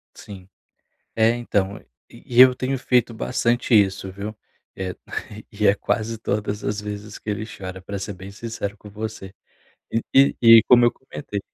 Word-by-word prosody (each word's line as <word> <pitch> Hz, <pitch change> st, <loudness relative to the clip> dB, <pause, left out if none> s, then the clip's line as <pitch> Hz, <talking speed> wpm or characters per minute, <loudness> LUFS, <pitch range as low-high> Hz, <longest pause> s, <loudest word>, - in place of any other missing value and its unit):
Sim. 95 Hz, -2 st, -12 dB, 0.7 s
É, 110 Hz, 0 st, +4 dB
então, 100 Hz, -5 st, -1 dB
e -, -, -24 dB, 0.2 s
e 120 Hz, 0 st, 0 dB
eu 130 Hz, 0 st, +9 dB
tenho 130 Hz, +1 st, -2 dB
feito 125 Hz, -2 st, +1 dB
bastante 120 Hz, +1 st, 0 dB
isso, 95 Hz, -2 st, +2 dB
viu. 100 Hz, +3 st, -7 dB, 0.4 s
É 95 Hz, -1 st, -5 dB, 0.6 s
e 105 Hz, +1 st, 0 dB
é 100 Hz, -, +5 dB
quase 110 Hz, +2 st, -2 dB
todas 105 Hz, -1 st, -3 dB
as 105 Hz, 0 st, -2 dB
vezes 105 Hz, 0 st, -7 dB
que -, -, -15 dB
ele 105 Hz, +1 st, -2 dB
chora, 95 Hz, -3 st, -8 dB
pra 100 Hz, +1 st, -5 dB
ser 100 Hz, 0 st, -5 dB
bem 95 Hz, +2 st, -10 dB
sincero 105 Hz, -1 st, -6 dB
com 105 Hz, -, -13 dB
você. 105 Hz, -2 st, -7 dB, 0.6 s
E 115 Hz, -, 0 dB
e 135 Hz, +1 st, +5 dB
e 115 Hz, -1 st, +9 dB
como 120 Hz, -1 st, +7 dB
eu 120 Hz, -, +4 dB
comentei 130 Hz, -5 st, -7 dB
105 Hz, 170 wpm, -22 LUFS, 100-115 Hz, 0.7 s, eu